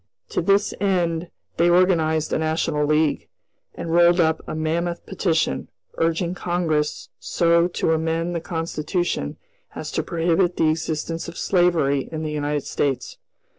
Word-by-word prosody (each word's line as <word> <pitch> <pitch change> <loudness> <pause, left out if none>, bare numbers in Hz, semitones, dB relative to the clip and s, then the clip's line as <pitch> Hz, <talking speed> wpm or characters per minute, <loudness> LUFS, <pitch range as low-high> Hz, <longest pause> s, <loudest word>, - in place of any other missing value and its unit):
To - - -1
this 200 0 +2
end 175 -4 0 0.3
they 170 +1 +4
organized 165 -3 +3
a - - +1
national 155 -1 0
league, 155 -1 +1 0.5
and 165 - -5
rolled 175 +1 +5
up 160 -1 +2
a - - -4
mammoth 170 +2 -2
petition, 175 -4 -1 0.3
urging 165 +2 +1
Congress 170 -4 -1
so 170 0 +2
to 175 -2 -1
amend 165 +2 -1
the 170 - -2
Constitution 165 +1 -2 0.4
as - - -5
to - - 0
prohibit 170 +1 +1
the 155 - +3
existence 160 +1 -2
of 170 - -8
slavery 170 -7 +2
in 160 -1 -4
the 155 - -3
United 145 -1 -1
States. 135 -4 -2
165 Hz, 140 wpm, -23 LUFS, 155-175 Hz, 0.5 s, rolled